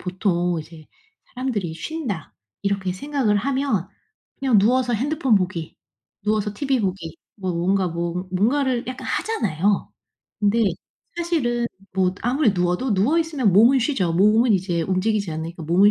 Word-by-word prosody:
보통 180 -2 0
이제 155 0 -13 0.5
사람들이 220 -10 -2
'쉰다.' 210 - -5 0.3
이렇게 195 -2 -1
생각을 265 -2 0
하면 260 -5 0 0.5
그냥 260 -5 +3
누워서 245 +4 +3
핸드폰 270 0 +1
보기, 180 -4 -1 0.5
누워서 210 -1 0
티비 270 0 0
보기 185 -5 -3 0.2
뭐 185 -3 -3
뭔가 185 +2 +1
뭐 170 +2 -3
뭔가를 245 +5 +1
약간 255 - -6
하잖아요. 205 - 0 0.5
근데 210 +3 +3 0.6
사실은 245 -9 0 0.3
뭐 185 -1 +1
아무리 245 -2 +2
누워도 180 +6 0
누워 245 - +3
있으면 290 - +1
몸은 235 +7 +6
쉬죠. 200 - 0
몸은 215 +4 +4
이제 180 -2 0
움직이지 195 +1 0
않으니까 160 +2 -5
몸은 190 +6 +5
205 Hz, 315 characters per minute, -22 LUFS, 180-255 Hz, 0.6 s, 몸은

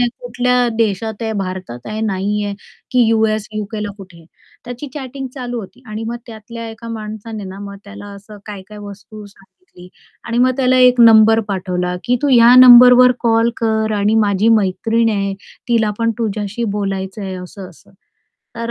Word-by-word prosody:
आहे, 245 - +2 0.2
कुठल्या 250 - 0
देशात 220 0 -2
आहे, 220 -1 -2
भारतात 185 -10 -7
आहे, 215 0 -5
नाहीये, 205 0 -2 0.4
की 245 -3 +3
यूएस, 220 -1 0
यूकेला 210 0 -5
कुठे. 180 -4 -14 0.4
त्याची 245 +4 -8
चॅटिंग 270 -1 -7
चालू 245 -3 -5
होती 210 +5 -14
आणि 215 +1 -6
मग 235 +1 -4
त्यातल्या 230 0 -9
एका 230 +1 -11
माणसाने 220 -1 -7
ना, 190 +1 -9
मग 200 0 -8
त्याला 205 0 -11
असं 205 +1 -13
काय-काय 210 0 -10
वस्तू 205 +1 -11
सांगितली 195 - -19 0.4
आणि 235 0 -3
मग 255 +1 +4
त्याला 255 -1 +2
एक 250 -1 +5
नंबर 225 -1 +6
पाठवला 180 -2 -3
की 250 0 +1
तू 290 - +1
ह्या 240 -1 +6
नंबरवर 250 0 +8
कॉल 230 0 +2
कर 220 -1 -1
आणि 205 +2 +1
माझी 200 +2 +1
मैत्रीण 225 +2 +1
आहे, 200 -1 -2 0.3
तिला 225 -3 +1
पण 230 0 +1
तुझ्याशी 215 0 -3
बोलायचंय 195 0 -4
असं-असं. 180 -1 -13 0.7
तर 230 0 -4
220 Hz, 155 wpm, -17 LUFS, 200-235 Hz, 0.7 s, नंबरवर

